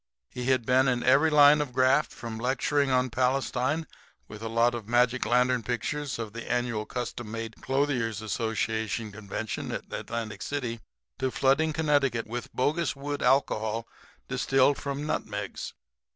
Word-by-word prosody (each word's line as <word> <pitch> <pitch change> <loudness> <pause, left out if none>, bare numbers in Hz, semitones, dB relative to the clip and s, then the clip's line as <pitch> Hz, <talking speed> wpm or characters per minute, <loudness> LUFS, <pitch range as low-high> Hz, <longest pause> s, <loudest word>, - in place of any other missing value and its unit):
He 125 - -5
had 130 -2 +2
been 130 +2 +4
in 125 -2 +1
every 140 +5 +5
line 150 0 +7
of 140 -4 -4
graft 130 +4 +3
from 115 -2 -7
lecturing 135 +3 +1
on 130 -1 +2
Palestine 130 +4 0 0.4
with 105 0 -10
a 115 - -4
lot 115 +2 +3
of 115 -3 -6
magic 125 +2 +2
lantern 125 0 +3
pictures 125 +5 -3
of 110 -3 -5
the 115 0 -6
annual 120 -3 -1
Custom 120 -2 -5
made 115 0 -6
Clothiers' 130 -6 0
Association 110 0 -2
convention 105 +1 -5
at - - -6
Atlantic 110 -3 -4
City 125 -5 -3 0.4
to 130 - +1
flooding 140 +5 +2
Connecticut 145 -6 +1
with 120 +2 -6
bogus 150 +3 0
wood 145 +1 -4
alcohol 115 -4 +1 0.4
distilled 135 +1 +2
from 140 +1 -4
nutmegs. 105 -9 -4
125 Hz, 150 wpm, -28 LUFS, 115-140 Hz, 0.4 s, line